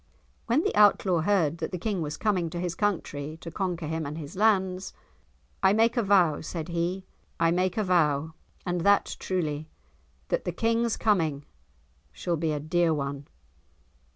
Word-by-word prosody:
When 250 +7 +2
the - - -1
Outlaw 200 -4 +4
heard 170 -3 +1
that - - -2
the 180 - -3
King 195 0 -2
was 150 -1 -4
coming 185 -6 0
to 175 - -5
his 175 -1 -2
country 160 -7 -2
to 165 - -8
conquer 180 -2 -2
him 160 +1 -2
and 145 +1 -5
his 150 0 -8
lands: 190 -3 +1 0.7
"I 190 +1 +5
make 225 +3 +3
a 240 - +2
vow," 190 -7 +3
said 160 +1 -5
he. 175 +3 -2 0.3
"I 165 0 +3
make 180 +2 0
a 215 - +2
vow, 160 -4 +2 0.3
and 175 -1 -1
that 200 +2 +3
truly, 155 -5 -2 0.6
that - - 0
the 180 - -3
King's 230 +3 +1
coming 160 -10 +1 0.7
shall 175 - -2
be 160 0 -1
a 150 - -1
dear 165 +3 +1
one." 140 0 -4
175 Hz, 170 wpm, -27 LUFS, 155-195 Hz, 0.7 s, I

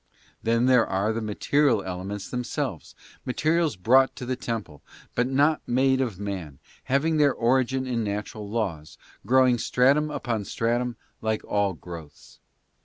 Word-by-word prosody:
Then 115 +2 +2
there 125 -3 +5
are 100 +4 0
the 115 - -3
material 110 +2 +1
elements 95 +2 -5
themselves, 125 -2 -4 0.3
materials 155 +2 +1
brought 130 +8 +4
to 125 - -6
the 130 +1 -1
temple, 110 - -5 0.3
but 120 - +1
not 145 +4 +2
made 130 +2 +2
of 115 -8 -2
man, 95 -9 -5 0.3
having 155 +4 +1
their 145 -2 +4
origin 130 +2 +1
in 120 -3 -1
natural 105 0 -4
laws, 95 -9 -3 0.3
grow 130 +2 +5
ing 125 -2 +2
stratum 140 +7 +3
upon 115 -8 -3
stratum, 120 +3 -1 0.3
like 110 -1 -1
all 100 -2 +1
growths. 80 -6 -11
120 Hz, 145 wpm, -26 LUFS, 100-130 Hz, 0.3 s, there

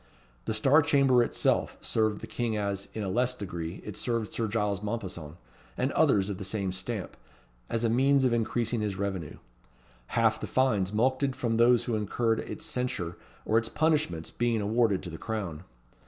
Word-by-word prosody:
The 110 - -1
Star 135 +8 +5
Chamber 140 -5 +4
itself 120 - +1
served 110 -2 0
the - - -5
king 115 -3 -2
as, 100 -1 -2
in 110 - -2
a - - -2
less 125 +6 +1
degree, 85 -5 -6
it 105 - -6
served 115 -3 -2
Sir 115 - -1
Giles 105 -2 -1
Mompesson, 95 -8 -5 0.4
and - - 0
others 100 -2 +3
of 100 -2 -4
the - - -4
same 95 -1 -1
stamp, 95 +2 -4 0.5
as 115 - -1
a - - +3
means 135 +4 +3
of 125 - +3
increasing 115 0 0
his 105 -2 -1
revenue; 95 -6 -3 0.7
half 115 -1 +2
the - - -5
fines 105 -8 +2
mulcted 130 +4 +1
from 115 -2 -1
those 120 0 +5
who 120 - -2
incurred 110 +2 0
its - - -6
censure 125 -10 -2 0.3
or 110 - +4
its 115 0 -6
punishments 150 - 0
being 120 -2 0
awarded 105 -1 +1
to 90 - -6
the 80 - -8
crown. 95 -7 -4
110 Hz, 180 wpm, -29 LUFS, 100-120 Hz, 0.7 s, Star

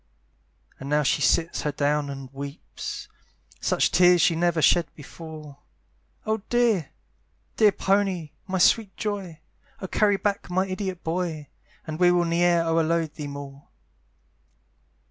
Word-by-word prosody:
And 135 - -7
now 150 0 +2
she 135 - +1
sits 170 0 +2
her 150 - -1
down 145 0 0
and 135 -1 -8
weeps; 140 +2 -7 0.5
Such - - +1
tears 180 0 +5
she 165 - +3
never 170 0 +1
shed 170 +1 +4
before; 155 -1 -11 0.7
"Oh 220 -1 -1
dear, 235 - +2 0.7
dear 215 -2 +6
pony! 195 -6 0 0.2
my 190 0 -1
sweet 200 +2 +3
joy! 195 -7 -4 0.4
"Oh - - -5
carry 205 +1 +2
back 200 -2 -2
my 185 +2 +1
idiot 185 -1 -4
boy! 165 -3 -3 0.4
"And 155 0 -6
we 180 -1 +5
will 175 -1 +2
ne'er 170 0 +2
o'erload 165 -1 +1
thee 150 -2 -6
more." 140 0 -9
170 Hz, 135 wpm, -25 LUFS, 150-190 Hz, 0.7 s, dear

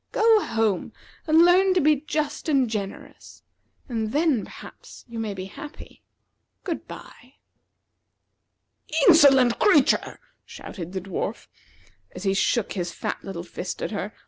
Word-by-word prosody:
Go 440 -1 +4
home 220 -5 -1 0.3
and 320 +2 +6
learn 370 +2 +4
to - - +4
be 305 -1 +3
just 300 +1 -3
and 270 -4 +3
generous; 205 -3 -7 0.4
and 225 -3 -3
then, 295 -6 +1
perhaps, - - -13
you 235 -1 -7
may 215 -3 -3
be 185 0 -6
happy. 295 +10 -11 0.6
Good - - -5
by." 255 +3 -13 1.7
"Insolent 270 -8 +6
creature!" 305 -10 +3 0.2
shouted 175 -2 -9
the 190 - -3
dwarf, 195 +3 -5 0.7
as 180 - -7
he 195 -1 +1
shook 210 +3 0
his 175 -3 -3
fat - - -5
little 180 -3 -6
fist 180 +1 -6
at - - -3
her. 205 -1 -4
235 Hz, 135 wpm, -24 LUFS, 195-305 Hz, 1.7 s, and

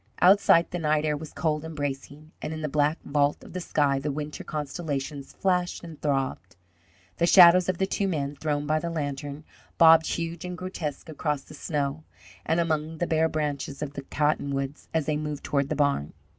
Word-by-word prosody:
Outside, 185 -2 +5
the 175 - -3
night 155 -1 +1
air 150 -1 +1
was 155 +1 -8
cold 155 -2 -1
and 160 0 -7
bracing, 145 +2 -5
and 160 - -4
in 155 - -6
the - - 0
black 150 +2 +1
vault 145 0 +1
of - - -12
the 185 - -3
sky 145 -5 +1
the 145 +2 -2
winter 150 +1 -5
constellations 145 -2 -4
flashed 180 -2 0
and 165 -3 -10
throbbed. 135 - -2 0.6
The 170 - +2
shadows 180 0 +8
of 185 - 0
the 190 - +1
two 195 +1 -1
men, 145 -5 -2
thrown 145 0 -2
by 155 +1 +1
the 170 - -3
lantern, 145 -2 -4 0.3
bobbed 160 -1 +7
huge 165 0 -3
and 180 0 -5
grotesque 170 -6 -5
across 150 -2 -2
the - - -14
snow 145 0 -2 0.4
and 160 +2 +2
among 160 -1 -1
the 175 - 0
bare 160 -1 +2
branches 145 -2 -3
of 145 -1 -5
the 140 - -5
cottonwoods, 140 -1 -1
as 160 -2 0
they 155 -1 0
moved 150 -1 -4
toward 140 -1 0
the 155 - -1
barn. 140 - 0
150 Hz, 195 wpm, -26 LUFS, 145-165 Hz, 0.6 s, shadows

